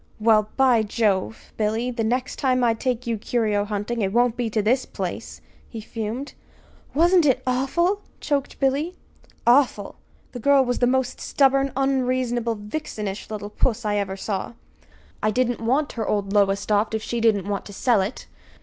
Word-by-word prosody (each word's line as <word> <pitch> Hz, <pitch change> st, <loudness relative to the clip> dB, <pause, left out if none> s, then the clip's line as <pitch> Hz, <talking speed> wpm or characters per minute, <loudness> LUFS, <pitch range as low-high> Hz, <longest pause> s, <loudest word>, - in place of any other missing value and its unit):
"Well, 215 Hz, -1 st, +3 dB
by 255 Hz, -4 st, +5 dB
Jove! 210 Hz, -1 st, -1 dB
Billy, 220 Hz, +3 st, 0 dB
the 235 Hz, -2 st, -2 dB
next 250 Hz, +3 st, -1 dB
time 255 Hz, -2 st, +1 dB
I 235 Hz, -1 st, +4 dB
take 250 Hz, +1 st, -2 dB
you 230 Hz, -2 st, -2 dB
curio 210 Hz, -3 st, 0 dB
hunting, 210 Hz, +3 st, -3 dB
it 195 Hz, -1 st, 0 dB
won't 240 Hz, +1 st, +2 dB
be 240 Hz, -2 st, -2 dB
to 220 Hz, -, -1 dB
this 235 Hz, +5 st, +2 dB
place," -, -, -6 dB, 0.3 s
he 230 Hz, -, -7 dB
fumed. 225 Hz, +5 st, -5 dB, 0.6 s
"Wasn't 345 Hz, +3 st, +5 dB
it 260 Hz, -3 st, +2 dB
awful!" 340 Hz, +10 st, +1 dB, 0.2 s
choked 280 Hz, -3 st, -2 dB
Billy. 285 Hz, +6 st, 0 dB, 0.5 s
"Awful! 240 Hz, -5 st, +3 dB, 0.3 s
The 245 Hz, -, -7 dB
girl 275 Hz, +2 st, +4 dB
was 245 Hz, 0 st, -1 dB
the 245 Hz, -, +3 dB
most 255 Hz, 0 st, 0 dB
stubborn, 275 Hz, 0 st, +2 dB
unreasonable, 255 Hz, -3 st, 0 dB
vixenish 210 Hz, -2 st, -5 dB
little 210 Hz, -1 st, -6 dB
puss 235 Hz, +1 st, 0 dB
I 205 Hz, 0 st, +1 dB
ever 195 Hz, -1 st, -2 dB
saw. 195 Hz, -, -3 dB, 0.7 s
I 215 Hz, -, +2 dB
didn't 245 Hz, +2 st, 0 dB
want 270 Hz, +6 st, +1 dB
her 225 Hz, -3 st, -4 dB
old 200 Hz, -1 st, -1 dB
Lowestoft 205 Hz, +2 st, +2 dB
if 220 Hz, -, -3 dB
she 235 Hz, -1 st, -3 dB
didn't 205 Hz, -4 st, +2 dB
want 200 Hz, -1 st, -3 dB
to 205 Hz, -, -10 dB
sell 230 Hz, 0 st, +2 dB
it! 200 Hz, +6 st, -4 dB
235 Hz, 170 wpm, -23 LUFS, 210-260 Hz, 0.7 s, by